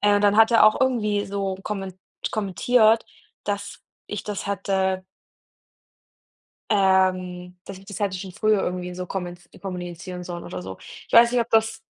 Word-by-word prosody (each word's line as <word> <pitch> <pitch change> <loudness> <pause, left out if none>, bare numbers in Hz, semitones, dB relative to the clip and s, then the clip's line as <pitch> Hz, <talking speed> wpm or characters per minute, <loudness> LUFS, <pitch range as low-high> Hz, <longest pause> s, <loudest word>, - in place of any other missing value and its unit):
Äh, 205 0 +4
und - - +1
dann 205 0 +4
hat 225 +1 +6
er 230 -2 +6
auch 215 +3 +5
irgendwie 210 -6 +1
so 195 -1 -3
kommen 195 -3 -5 0.3
kommentiert, 220 +2 +3 0.4
dass 200 0 -4 0.3
ich 210 - -5
das 205 -2 -4
hätte 190 -1 -1 1.7
ähm, 185 -3 +1
dass 195 - -8
ich 195 - -16
das 200 -1 -8
hätte 195 -2 -1
schon 190 0 -7
früher 210 +1 +2
irgendwie 180 0 -3
so 180 0 -4
komment 175 -1 -5 0.2
kommunizieren 180 -1 -6
sollen 175 -1 -6
oder 90 0 -6
so. 95 0 -7
Ich - - -14
weiß 235 +1 +8
nicht, 250 - +2
ob 230 - -5
das 225 0 +2
195 Hz, 165 wpm, -24 LUFS, 180-210 Hz, 1.7 s, weiß